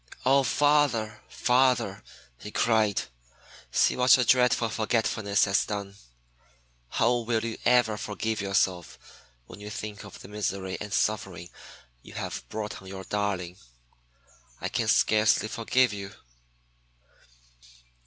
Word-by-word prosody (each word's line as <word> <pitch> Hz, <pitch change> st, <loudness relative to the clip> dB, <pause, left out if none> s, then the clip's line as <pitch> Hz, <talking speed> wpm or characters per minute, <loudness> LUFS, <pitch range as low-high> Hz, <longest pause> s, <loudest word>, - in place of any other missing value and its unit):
"Oh, 135 Hz, +2 st, +5 dB
father, 135 Hz, -7 st, +1 dB
father," 125 Hz, -5 st, +1 dB, 0.4 s
he 105 Hz, -, -8 dB
cried, 110 Hz, -2 st, +1 dB, 0.7 s
"see -, -, +3 dB
what 125 Hz, 0 st, +6 dB
your 125 Hz, -, +1 dB
dreadful 125 Hz, -1 st, +3 dB
forgetfulness 110 Hz, -2 st, +1 dB
has 95 Hz, 0 st, +2 dB
done! 100 Hz, -2 st, -5 dB, 1.0 s
How 120 Hz, -, +2 dB
will 115 Hz, -1 st, -1 dB
you 115 Hz, -1 st, -5 dB
ever 120 Hz, -3 st, +3 dB
forgive 105 Hz, +1 st, -3 dB
yourself 95 Hz, -3 st, 0 dB, 0.5 s
when -, -, -12 dB
you 105 Hz, 0 st, -8 dB
think 105 Hz, 0 st, -7 dB
of 100 Hz, -, -11 dB
the -, -, -11 dB
misery 100 Hz, -2 st, -3 dB
and 105 Hz, -, -6 dB
suffering 95 Hz, -6 st, -2 dB, 0.5 s
you -, -, -14 dB
have -, -, -5 dB
brought 105 Hz, -3 st, -5 dB
on 95 Hz, -, -13 dB
your 95 Hz, 0 st, -7 dB
darling! 95 Hz, -3 st, -3 dB, 1.0 s
I -, -, -3 dB
can -, -, -1 dB
scarcely 110 Hz, 0 st, +3 dB
forgive 115 Hz, +1 st, +1 dB
you." 100 Hz, -1 st, -7 dB
105 Hz, 125 wpm, -27 LUFS, 100-115 Hz, 1.0 s, what